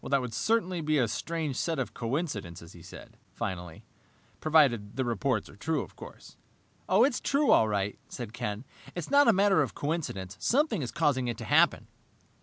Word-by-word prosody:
"That 140 0 +1
would 125 -3 -5
certainly 185 - 0
be 155 0 +1
a 125 -4 +2
strange 155 +4 -3
set 165 +3 -1
of 125 -6 -3
coincidences," 110 - -4
he 85 - -13
said - - -12 0.2
finally, 90 -4 -5 0.6
"provided 135 -10 +3
the 130 - -1
reports 120 -1 -1
are - - -14
true, 155 +9 -1
of - - -14
course." - - -12 0.5
"It's 235 +7 +3
true, 285 +1 +2
all 110 - +5
right," 100 -1 -2
said 115 -3 -7
Ken. 105 +2 -4 0.3
"It's 175 -3 -5
not 285 -1 +6
a - - +8
matter 195 -3 +4
of 135 - -2
coincidence. 120 - -3
Something 250 - +1
is 125 - -4
causing 130 -3 +1
it 120 - -3
to - - -7
happen!" - - +3
135 Hz, 180 wpm, -29 LUFS, 105-170 Hz, 0.6 s, a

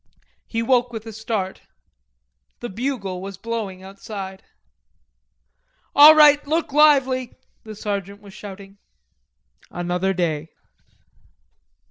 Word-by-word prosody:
He 230 0 -2
woke 245 0 +2
with 225 -1 -7
a 225 - -8
start. 215 -3 -4 1.0
The 240 - -6
bugle 200 -5 -4
was 195 -1 -8
blowing 210 -4 -5
outside. 195 0 -8 1.5
"All 300 +2 +9
right, 295 -1 +6
look 315 -1 -1
lively!" 270 -4 +3 0.3
the 215 -1 -9
sergeant 200 -1 -5
was 200 -2 -15
shouting. 200 -1 -11 0.9
Another 175 +2 -2
day. 160 -3 -2
210 Hz, 100 wpm, -22 LUFS, 190-250 Hz, 1.5 s, All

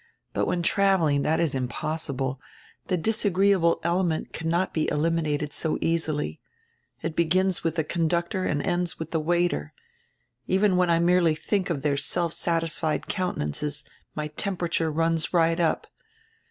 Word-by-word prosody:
But - - 0
when 175 -1 0
traveling 170 -7 +3
that 160 +3 +1
is 165 -4 +1
impossi 140 +3 -3
ble, 135 0 -2 0.5
the 185 - +1
disagreeable 195 -2 +2
element 170 -1 0
cannot 170 +3 -1
be 155 - 0
eliminated 150 -2 0
so 160 - -1
easily. 155 - -1 0.6
It 160 - -3
begins 185 +3 +2
with 165 -1 0
the 160 - +1
conductor 170 +3 0
and 145 -4 0
ends 175 -1 -1
with 160 0 -6
the 165 - +1
w 170 +3 +1
r - - +4
aiter. 75 - -4 0.8
Even 190 +1 +3
when 180 -1 +3
I 170 - +4
merely 170 -1 +3
think 190 +4 -1
of 145 -5 -2
their 145 -2 +1
self 170 +3 -1
satisfied 165 -2 -1
counte 185 -1 -2
nances 145 - -3 0.3
my 150 0 -3
temperature 170 -1 -1
runs 165 +2 0
right 165 0 +3
up. 165 -2 +1
165 Hz, 155 wpm, -26 LUFS, 155-175 Hz, 0.8 s, r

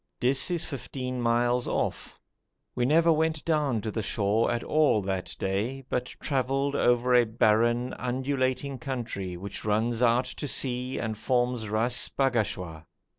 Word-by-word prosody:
Dis 130 +6 +2
is 175 -2 -1
fifteen 130 -3 -5
miles 120 +1 +1
off. - - -2 0.6
We 120 - 0
never 165 +4 +4
went 160 0 0
down 150 -8 +1
to 110 - -4
the 110 - -2
shore 105 +1 +1
at 120 - -2
all 150 -9 +2
that 95 -1 -3
day, 110 +8 -2
but 125 - -1
travelled 135 +1 0
over 120 -1 +3
a 125 -1 +6
barren, 115 +2 +2
undulating 130 +1 -1
country 115 -9 -4
which 100 +2 -7
runs 110 +3 0
out 120 +1 +3
to 145 +3 -5
sea 125 -1 -1
and 110 -1 -2
forms 120 -1 0
Ras 115 +3 +1
Bagashwa. 105 - -1
125 Hz, 145 wpm, -27 LUFS, 110-135 Hz, 0.6 s, a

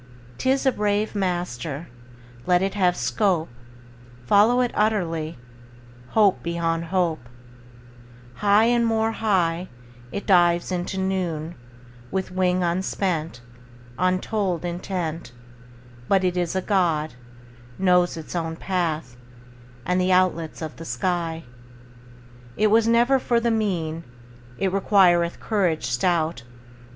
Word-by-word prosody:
'Tis 265 +1 +1
a 265 - +5
brave 210 -1 0
master; 175 - -3 0.6
Let 180 0 +3
it 195 - -1
have 180 -3 +2
scope: 185 -7 0 0.8
Follow 215 - +4
it 245 - 0
utterly, 170 -8 -1 0.8
Hope 205 -3 +4
beyond 170 -1 -1
hope: 165 -8 -1 1.1
High 205 +1 +4
and 235 +1 +3
more 225 -1 +1
high 185 -6 0 0.4
It 200 - -5
dives 175 -2 +3
into 180 +1 -3
noon, 180 -4 -2 0.6
With 190 -1 -3
wing 185 0 +1
unspent, 170 -4 -2 0.6
Untold 185 -1 0
intent; 170 -4 -4 0.7
But 195 -1 +3
it 180 -1 +1
is 175 0 -1
a 190 - -1
God, 165 -6 +1 0.6
Knows 180 -2 +2
its 160 +2 -8
own 165 -1 -2
path 165 -8 -2 0.7
And 180 0 +1
the 185 +1 +1
outlets 180 -3 +1
of 155 - -7
the 165 - -8
sky. 165 +4 -2 1.1
It 215 0 +3
was 225 +1 +4
never 240 +3 +4
for 240 -2 +1
the 235 0 0
mean; 170 -7 -1 0.5
It 190 -1 -1
requireth 180 -4 +3
courage 185 -7 0
stout. 160 +3 0
180 Hz, 115 wpm, -23 LUFS, 165-200 Hz, 1.1 s, a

